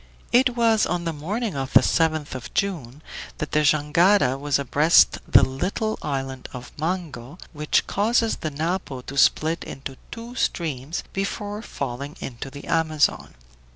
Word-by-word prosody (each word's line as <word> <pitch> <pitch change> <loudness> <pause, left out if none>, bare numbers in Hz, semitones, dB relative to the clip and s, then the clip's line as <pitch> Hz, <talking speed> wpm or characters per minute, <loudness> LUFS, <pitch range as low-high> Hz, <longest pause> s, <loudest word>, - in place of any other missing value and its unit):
It 250 0 +4
was 225 -2 +3
on 175 -1 -2
the 165 -1 -2
morning 195 +6 -3
of 135 0 -4
the - - +8
7th 155 -2 +1
of 130 -2 -7
June 155 -8 -2 0.3
that 150 - -4
the 150 - +3
jangada 155 +2 +3
was 145 -1 +1
abreast 145 +4 +4
the - - +6
little 195 - -1
island 135 -2 -4
of 125 -1 -8
Mango, 160 -4 -4 0.2
which 150 0 +1
causes 225 +2 +1
the 155 - -3
Napo 155 -2 -3
to 135 - -9
split 155 +4 +3
into 135 0 -8
two 230 +1 -8
streams 155 - -2
before 205 +2 -3
falling 140 - -5
into 130 +1 -6
the 140 +1 -10
Amazon. 155 -2 +1
155 Hz, 150 wpm, -24 LUFS, 140-195 Hz, 0.3 s, the